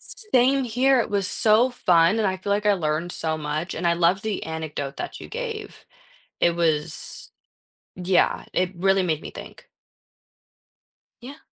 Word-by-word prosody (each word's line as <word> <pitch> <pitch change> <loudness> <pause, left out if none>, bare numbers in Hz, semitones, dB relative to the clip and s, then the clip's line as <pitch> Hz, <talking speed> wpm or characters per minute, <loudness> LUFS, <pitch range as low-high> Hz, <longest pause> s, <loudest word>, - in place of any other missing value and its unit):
S - - -9 0.2
same 260 +2 +4
here, 255 +3 +2
it 230 - -1
was 200 -2 0
so 220 +3 +3
fun, 180 -6 +3
and 215 - +1
I 190 0 -1
feel 190 - -8
like 205 +1 +1
I 210 - +4
learned 165 -1 -1
so 160 -1 -2
much, 155 +3 -4
and 170 - -2
I 170 - +4
love 175 +3 +2
the 215 -3 -3
anecdote 155 -3 -5
that - - -6
you - - -9
gave. 450 -3 -6 0.6
It 170 - +4
was 160 -3 -2 0.7
yeah, 180 0 +1
it 180 0 0
really 195 +2 +2
made 160 -4 -1
me - - -9
think. - - -11 1.5
Yeah. 275 +5 -10
185 Hz, 165 wpm, -24 LUFS, 165-220 Hz, 1.5 s, same